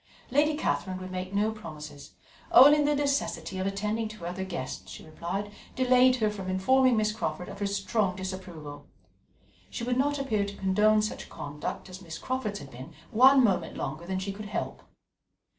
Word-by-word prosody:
Lady 300 +2 +3
Catherine 190 -10 -1
would 185 0 -7
make 185 0 -4
no 205 +2 +1
promises. 155 -9 -9 0.4
Only 290 +4 +8
the 295 0 +2
necessity 280 -9 -1
of 190 - -1
attending 210 +3 -1
to 215 0 -10
her 170 - -9
other 180 +2 -3
guests, 175 -9 -5
she - - -10
replied, 185 +6 -4 0.2
delayed 255 0 +5
her 215 -4 +1
from 190 -3 -6
informing 250 +7 +3
Miss 215 0 +2
Crawford 180 -5 -3
of - - -9
her 200 - 0
strong 200 -1 0
disapproval. 185 -6 -7 0.8
She 235 - -5
would 245 +1 0
not 290 +2 +2
appear 235 -7 0
to 200 0 -6
condone 210 +3 +3
such 215 - -4
conduct 145 +5 -6
as 185 0 -10
Miss 165 -3 -7
Crawford's 255 -6 -3
had 140 -5 -10
been 130 +7 -10 0.2
one 260 +3 +7
moment 195 -6 +1
longer 170 +3 -5
than 190 0 -1
she 190 +1 -3
could 210 +2 -8
help. 210 - -4
200 Hz, 180 wpm, -28 LUFS, 185-245 Hz, 0.8 s, Only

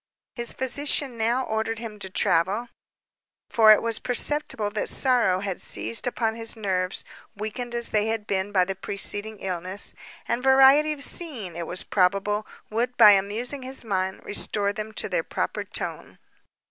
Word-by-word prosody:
His 235 -1 +2
physician 270 0 0
now 230 +3 0
ordered 220 +1 -2
him 220 -2 -8
to 190 - -5
travel; 190 +7 +1 0.8
for 220 -2 +6
it 215 - +5
was 230 -1 -1
perceptible 250 -4 +1
that 210 - 0
sorrow 240 -8 +2
had 195 -3 -4
seized 230 +2 0
upon 225 -2 -1
his 225 +1 -6
nerves, 190 -4 -1 0.3
weakened 225 +4 -5
as 235 0 +1
they 210 0 +1
had 220 -1 -2
been 195 0 -1
by 185 -3 +3
the 195 - -2
preceding 205 +3 -1
illness; 185 +1 -4 0.3
and 240 - -1
variety 270 +3 +6
of 280 -2 -6
scene, 245 - -1
it 170 -1 -5
was 180 - -2
probable, 200 +3 0 0.2
would, 245 +3 -2
by 215 -3 +9
amusing 215 +8 0
his 260 +1 -3
mind, 190 -2 -2
restore 205 0 0
them 215 +1 -5
to - - -2
their - - -1
proper - - -3
tone. - - -5
220 Hz, 160 wpm, -25 LUFS, 200-245 Hz, 0.8 s, by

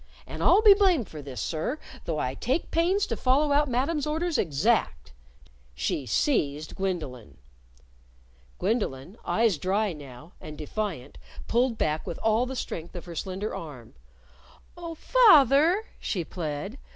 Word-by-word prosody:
And - - -7
I'll 435 - +5
be 420 -2 +10
blamed 370 - +2
for 155 - -8
this, 135 -4 -8
sir, 165 - -2 0.3
though 160 - -2
I 130 -3 -1
take 260 - -2
pains 360 +5 +2
to 230 - -3
follow 275 +5 +2
out 290 0 +3
Madam's 280 +5 0
orders 320 +1 -1
exact," 175 - 0 0.6
She 125 - -2
seized 150 - 0
Gwendolyn. 145 - -4 1.2
Gwendolyn, 190 - -2
eyes 220 -8 +1
dry 195 +3 0
now, 145 +1 -12
and 155 -1 -9
defiant, 155 -4 -5 0.3
pulled 240 0 +1
back 155 0 -1
with - - -4
all 225 +3 +2
the 265 - -5
strength 170 -7 -6
of 175 - -7
her 175 - -8
slender 190 +5 -4
arm. 130 -8 -9 0.8
"Oh, 335 -1 -7
fath 395 - +6
er!" 335 +10 +3
she 180 -5 -2
plead. 160 - -5
205 Hz, 145 wpm, -27 LUFS, -, 1.2 s, be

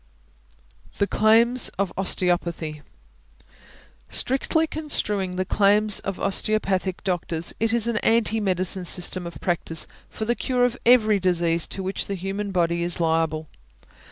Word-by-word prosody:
THE 200 - +2
CLAIMS 230 +4 +4
OF 195 -2 -1
OSTEOPATHY. 175 -5 -1 1.3
Strictly 275 +5 0
construing 210 -12 -1
the 185 +1 -2
claims 210 +2 +4
of 195 -1 -5
osteopathic 195 -2 -1
doctors, 175 -3 -2
it 225 0 +1
is 235 -1 +1
an 235 -2 -1
anti 225 0 +2
medicine 185 -2 -1
system 180 0 0
of 170 - -10
practice 165 -2 -2 0.2
for 220 - -5
the 240 - +1
cure 245 +1 0
of 245 0 -1
every 220 -4 +5
disease 170 -2 +1
to 195 - -6
which 190 +1 -3
the 200 - -3
human 195 +2 -4
body 170 -2 0
is 175 0 -1
liable. 160 -1 0
195 Hz, 135 wpm, -23 LUFS, 175-220 Hz, 1.3 s, every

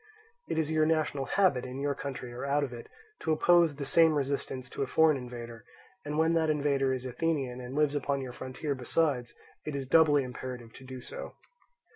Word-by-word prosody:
It - - -1
is 160 -1 0
your 155 -1 +3
national 155 -4 0
habit, 180 -7 +2
in 130 +1 -6
your 140 0 0
country 135 -3 -6
or 120 - -6
out 140 +1 +1
of 130 -3 -4
it, 120 -1 -9 0.3
to 160 - -1
oppose 170 0 +4
the 140 0 -5
same 160 +3 +5
resistance 135 -2 -2
to - - -5
a 135 - 0
foreign 160 +2 +4
invader; 120 -3 -7 0.4
and 150 +1 -3
when 160 +1 +3
that 160 -1 +2
invader 140 -3 +2
is 130 -1 -3
Athenian, 130 -2 -1
and 125 +2 -7
lives 150 -1 +2
upon 140 -1 0
your 130 -2 -5
frontier 130 +4 -4
besides, 130 -1 0 0.3
it 150 - -4
is 135 -1 -3
doubly 145 -1 +5
imperative 125 -2 -7
to 130 - -12
do 130 -1 -8
so. - - -8
140 Hz, 200 wpm, -30 LUFS, 130-155 Hz, 0.4 s, same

